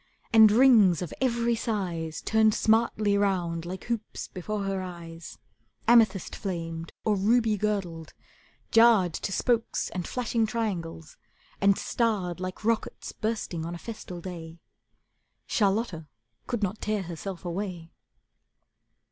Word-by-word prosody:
And 220 -2 +8
rings 215 -8 +5
of 170 - -6
every 235 -2 +1
size 180 -8 -3
Turned 220 -1 +3
smartly 220 -2 +2
round 175 -4 0
like 185 +1 -6
hoops 230 -3 -4
before 200 +3 -4
her 195 -1 -2
eyes, 170 -2 -9 0.5
Amethyst 220 -6 +4
flamed 165 -4 -5
or 215 -2 +3
ruby 220 +2 +3
girdled, 185 -6 -2 0.6
jarred 225 -7 +5
To 195 - -4
spokes 230 +3 0
and 180 -1 -4
flashing 235 -2 0
triangles, 175 -8 -4 0.4
and 200 0 +4
starred 200 -7 -1
Like 185 +3 -6
rockets 230 -1 -1
bursting 215 -7 -3
on 170 +1 -5
a - - -6
festal 180 -4 -8
day. 165 -2 -8 0.9
Charlotta 200 -6 0 0.4
could 240 -4 -2
not 200 +2 -2
tear 215 -2 -1
herself 180 +2 -7
away. 175 -2 -4
195 Hz, 120 wpm, -27 LUFS, 175-220 Hz, 0.9 s, And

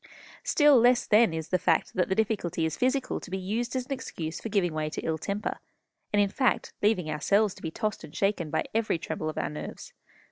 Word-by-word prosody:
"Still 295 -4 +5
less, 245 +1 +4
then, 215 -2 +5
is 160 0 -4
the 185 - +2
fact 165 -2 +1
that 180 0 0
the 190 - +1
difficulty 195 -7 0
is 160 - -2
physical 260 +1 0
to - - -10
be 190 - -2
used 225 +7 -2
as 255 -1 -1
an 275 - -14
excuse 170 -11 -4
for 225 - -4
giving 190 -5 +1
way 155 0 -1
to - - -5
ill 160 -1 -2
temper, 200 +5 -3 0.5
and, 205 - +2
in 200 -1 +4
fact, 255 +3 0
leaving 205 -6 +2
ourselves 195 +7 +2
to - - -15
be 160 - -3
tossed 215 +3 -3
and 155 -2 -11
shaken 195 -5 0
by 160 - 0
every 225 -5 +1
tremble 160 -1 -4
of 155 - -7
our - - -1
nerves. 150 - -8
195 Hz, 225 wpm, -28 LUFS, 160-225 Hz, 0.5 s, Still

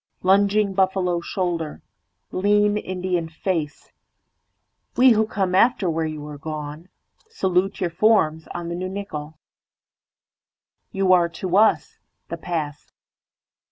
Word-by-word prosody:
Lunging 200 +2 +3
buffalo 185 -2 +1
shoulder, 170 -4 -3 0.5
Lean 205 +2 +2
Indian 180 -4 -2
face, 165 -2 -4 1.1
We 255 +1 +7
who 220 -1 +3
come 190 -4 -1
after 195 -3 +3
where 160 0 -1
you 155 -1 -6
are 150 -1 -9
goneSalute 175 - -4
your 175 -3 -1
forms 165 -4 +2
on 170 -1 -6
the 170 - -3
new 185 +1 -4
nickel. 160 -6 -6 1.5
You 195 0 -1
areTo 175 0 +2
us:The 215 +2 0
past. 150 -4 -5
180 Hz, 105 wpm, -23 LUFS, 160-200 Hz, 1.5 s, We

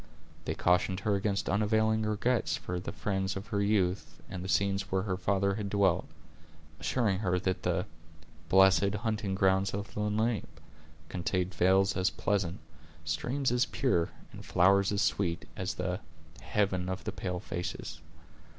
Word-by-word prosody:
They - - -2
cautioned 90 +1 +2
her 105 +1 +1
against 100 0 0
unavailing 110 +2 +2
regrets 110 +3 0
for 90 0 -4
the 90 - -5
friends 95 -1 -2
of 95 +1 -5
her 100 -2 0
youth, 100 -3 0
and 90 -1 -5
the 95 - -5
scenes 100 0 +1
where 95 0 +1
her 100 -3 -1
father 100 +1 +1
had 100 0 -3
dwelt; 100 -4 +2 0.7
assuring 110 -7 +1
her 90 -4 +1
that 95 -1 -1
the - - 0 0.6
"blessed 95 +1 +5
hunting 105 -3 -1
grounds 95 0 +2
of 100 -1 -5
the - - -5
Lenape," 105 -5 -1 0.5
contained 90 +1 -2
vales 95 +2 +3
as 95 0 +2
pleasant, 95 -3 -1 0.4
streams 135 0 -1
as 125 +1 +2
pure; 105 -14 +1 0.2
and - - -10
flowers 100 +2 +4
as 100 - +1
sweet, 85 -4 0
as 95 +1 -3
the 90 0 -2 0.4
"heaven 95 -3 0
of 95 -2 -4
the - - -3
pale 90 -1 -4
faces." 90 -2 -5
95 Hz, 155 wpm, -30 LUFS, 95-105 Hz, 0.7 s, blessed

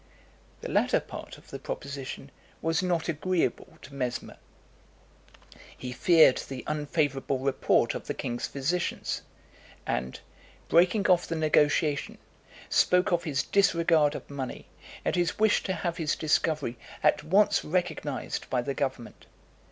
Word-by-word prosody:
The - - -5
latter - - +3
part - - -9
of - - -18
the - - -6
proposition 140 0 -6 0.3
was 165 +1 0
not 175 -3 0
agreeable 170 -3 -1
to 140 - -12
Mesmer. 125 -3 -4 1.4
He 125 - -6
feared 160 +1 +5
the 130 -2 -6
unfavourable 145 -3 -1
report 135 +1 +2
of - - -7
the - - -3
king's 120 0 -3
physicians; 160 +6 -2 0.6
and, 65 +1 -2 0.5
breaking 180 +5 +4
off 180 -2 +3
the 165 - -2
negotiation, 150 -1 +2 0.5
spoke 180 +1 +3
of 175 0 +1
his 140 -3 0
disregard 170 -6 +3
of - - -7
money, 135 -3 -6 0.4
and - - +1
his 175 -2 0
wish 215 -1 +3
to 190 - 0
have 170 0 -3
his 160 -3 0
discovery 155 -5 0 0.2
at 150 0 +3
once 200 +5 +3
recognised 155 -4 -2
by 125 -2 0
the 140 - -2
government. 135 -4 -4
155 Hz, 135 wpm, -28 LUFS, 135-175 Hz, 1.4 s, feared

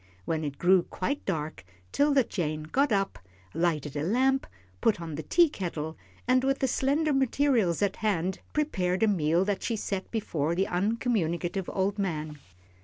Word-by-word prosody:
When 160 -1 -1
it 140 -2 -4
grew 185 +1 +5
quite 190 +10 -3
dark 150 - -3 0.3
'Tilda 285 -2 +3
Jane 155 -8 -3
got 270 - +1
up, 195 -1 0 0.3
lighted 155 -4 0
a 145 - -1
lamp, 260 - +2 0.3
put 215 - +2
on 165 -2 -6
the 150 - -4
teakettle, 175 - +1 0.3
and 255 +1 +4
with 270 0 +2
the 265 - +1
slender 285 +4 +1
materials 260 - +2
at 200 -1 0
hand 190 -4 0
prepared 185 -11 0
a - - +5
meal 170 -2 +2
that 205 -1 -1
she 230 - -1
set 195 -2 -3
before 165 -8 -1
the 190 +2 +2
uncommunicative 190 -3 -1
old 200 +2 -1
man. 155 -6 -3
190 Hz, 160 wpm, -28 LUFS, 165-245 Hz, 0.3 s, grew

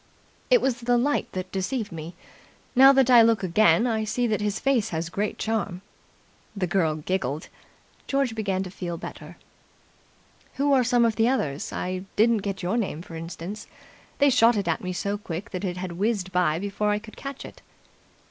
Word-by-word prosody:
"It - - +5
was 250 -3 0
the 245 0 +2
light 285 +5 0
that 185 0 -5
deceived 210 +4 -2
me. 165 +1 -7 0.6
Now 270 +2 +9
that 265 -2 +4
I 240 -2 +9
look 225 -3 +3
again, 215 +5 +4
I 220 -3 0
see 240 +3 -1
that 215 -2 0
his 210 0 -1
face 270 -6 +1
has 165 0 -3
great 205 +4 -2
charm." 205 -4 -2 0.7
The 195 -2 -1
girl 170 -3 +1
giggled. 155 -2 -3 0.6
George 275 -4 0
began 195 -4 -1
to 185 - -8
feel 175 -3 -5
better. - - -9 1.2
"Who 280 +1 +2
are 260 -2 +4
some 245 -1 +3
of 225 -1 0
the 225 0 +3
others? 150 - -2
I 185 +1 -4
didn't 230 +2 +4
get 195 -2 -4
your 185 +6 0
name, 185 -8 -2
for 165 - -10
instance. 170 +5 -7 0.5
They 285 -1 +4
shot 230 -2 +5
it 200 -3 -2
at 165 - 0
me 185 - -3
so 200 +4 -2
quick 185 +2 -6
that 185 0 -5
it 180 -2 -2
had 180 0 -4
whizzed 195 +1 -1
by 175 -4 +2
before 205 +3 -2
I 210 - +2
could 215 +1 -11
catch 275 -1 -7
it." - - -12
205 Hz, 190 wpm, -25 LUFS, 180-235 Hz, 1.2 s, Now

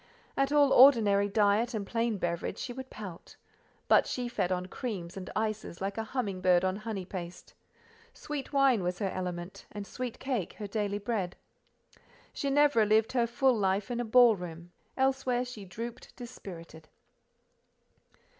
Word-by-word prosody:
At 275 0 +1
all 290 -2 +5
ordinary 210 -7 +6
diet 215 +4 +2
and 205 -2 -3
plain 230 0 -1
beverage 170 -2 -2
she 245 - -5
would 260 +1 -8
pout; 190 -6 -9 0.5
but - - +5
she 250 -1 -2
fed 185 -6 -1
on 180 0 -1
creams 185 -4 -5
and 190 -1 -7
ices 215 -4 -2
like 195 +1 -3
a 225 - -2
humming 215 -6 -3
bird 180 0 +4
on 185 +1 0
honey 210 -3 -5
paste: 175 -2 -8 0.6
sweet 295 - -6
wine 275 -6 +4
was 180 0 -2
her 195 -2 -2
element, 180 0 -5
and 205 -1 -6
sweet 250 +2 -5
cake 250 -9 -3
her 210 - -7
daily 205 0 -2
bread. 205 -4 -2 1.0
Ginevra 280 -5 +3
lived 220 +1 +3
her 240 -2 +2
full 260 +2 +2
life 200 +2 0
in 240 - -2
a - - 0
ball 240 0 +6
room; 175 -1 -8 0.3
elsewhere 265 -2 +1
she 230 -5 -9
drooped 230 +5 -8
dispirited. 170 -10 -10
215 Hz, 155 wpm, -30 LUFS, 190-245 Hz, 1.0 s, ordinary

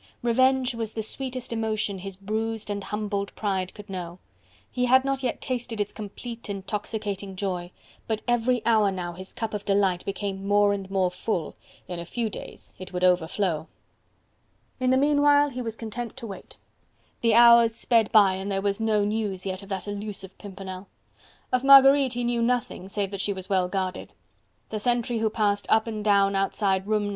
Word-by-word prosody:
Revenge 260 +2 +3
was 225 -2 -4
the 220 - -3
sweetest 255 +1 -5
emotion 215 -3 -1
his 195 0 -7
bruised 220 +2 -3
and 200 -1 -3
humbled 205 -1 -3
pride 190 -3 -1
could 210 -1 -11
know: 180 -3 -6 0.5
he 250 -1 0
had 260 +2 +5
not 275 -1 -1
yet 255 - -2
tasted 240 -3 -4
its 205 0 -1
complete 225 +2 -8
intoxicating 200 0 -4
joy: 185 -2 -3 0.4
but 220 -1 -2
every 240 0 +1
hour 220 -3 +4
now 180 -2 -4
his 185 +2 -9
cup 225 -3 -4
of 205 -1 -3
delight 195 -3 +1
became 195 0 -4
more 205 0 +4
and 195 -1 -5
more 190 -2 +1
full: 180 -3 -3 0.3
in 180 -1 -5
a 170 - -6
few 225 +4 -3
days - - -9
it 185 0 -8
would 180 0 -3
overflow. 180 -2 +1 1.1
In 255 0 +1
the 260 - +4
meanwhile 290 +1 +4
he 250 0 -5
was 225 -2 -4
content 230 +2 -6
to 250 - -7
wait. 200 -4 -10 0.6
The 230 -2 +3
hours 235 -1 +7
sped 230 -2 +2
by 205 -4 +6
and 190 +2 -4
there 195 - 0
was 200 +1 -1
no 215 -2 +2
news 205 -3 -2
yet 190 0 -3
of 200 - -13
that 195 0 -4
elusive 205 -2 -5
Pimpernel. 190 -1 -8 0.6
Of 255 0 +1
Marguerite 275 -1 +7
he 245 0 -2
knew 240 0 0
nothing 235 -5 -1
save 200 -1 -2
that 200 -1 -3
she 200 - 0
was 190 0 -7
well 185 -2 +2
guarded; 185 -1 -3 0.6
the 215 - -3
sentry 240 +1 +1
who 220 0 +1
passed 205 -2 0
up 220 0 +4
and 215 -2 -4
down 200 -1 +3
outside 195 0 0
room 215 -1 +1
No. - - -2
210 Hz, 185 wpm, -26 LUFS, 195-235 Hz, 1.1 s, hours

